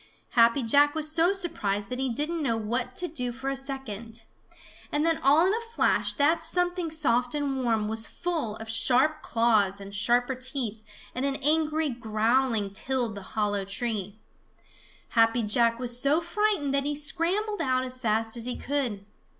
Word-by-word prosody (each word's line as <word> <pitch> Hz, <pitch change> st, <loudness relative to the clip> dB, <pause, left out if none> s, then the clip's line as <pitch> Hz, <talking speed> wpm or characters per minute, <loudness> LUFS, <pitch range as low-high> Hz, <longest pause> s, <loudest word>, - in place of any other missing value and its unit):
Happy 235 Hz, +3 st, +4 dB
Jack 285 Hz, +6 st, +4 dB
was 310 Hz, -1 st, 0 dB
so 335 Hz, +3 st, +3 dB
surprised 205 Hz, -, -2 dB
that 250 Hz, -, -4 dB
he 265 Hz, 0 st, 0 dB
didn't 305 Hz, +7 st, -2 dB
know 235 Hz, -6 st, 0 dB
what 240 Hz, +3 st, -3 dB
to 360 Hz, -, -3 dB
do 250 Hz, -7 st, -4 dB
for 265 Hz, +3 st, -4 dB
a -, -, -2 dB
second. 235 Hz, -5 st, -6 dB, 0.7 s
And 295 Hz, +2 st, +1 dB
then 330 Hz, -1 st, +2 dB
all 290 Hz, +6 st, +5 dB
in 380 Hz, -, +2 dB
a 460 Hz, +1 st, -5 dB
flash -, -, +2 dB
that 310 Hz, +4 st, +2 dB
something 355 Hz, +1 st, -1 dB
soft 250 Hz, -5 st, +1 dB
and 275 Hz, -3 st, -1 dB
warm 225 Hz, -3 st, +1 dB
was 220 Hz, +1 st, -2 dB
full 315 Hz, -12 st, -3 dB
of 225 Hz, 0 st, -9 dB
sharp 255 Hz, +7 st, +2 dB
claws 215 Hz, -4 st, +2 dB
and 200 Hz, 0 st, -9 dB
sharper 240 Hz, +5 st, +2 dB
teeth, 255 Hz, -4 st, -3 dB, 0.3 s
and 255 Hz, -, -3 dB
an 275 Hz, -1 st, 0 dB
angry 310 Hz, 0 st, +1 dB
growling 225 Hz, -1 st, 0 dB
tilled 245 Hz, +1 st, -1 dB
the 200 Hz, -, -8 dB, 0.2 s
hollow 205 Hz, -2 st, 0 dB
tree. 205 Hz, 0 st, -3 dB, 0.9 s
Happy 230 Hz, +1 st, +3 dB
Jack 230 Hz, +2 st, +3 dB
was 245 Hz, 0 st, -2 dB
so 285 Hz, +3 st, +4 dB
frightened 340 Hz, -4 st, 0 dB
that 275 Hz, 0 st, +1 dB
he 295 Hz, 0 st, -1 dB
scrambled 360 Hz, +8 st, -1 dB
out 255 Hz, -1 st, +1 dB
as 255 Hz, 0 st, -3 dB
fast 225 Hz, -1 st, 0 dB
as 235 Hz, -1 st, -5 dB
he 250 Hz, -, -2 dB
could. 250 Hz, -8 st, -2 dB
255 Hz, 175 wpm, -27 LUFS, 225-300 Hz, 0.9 s, all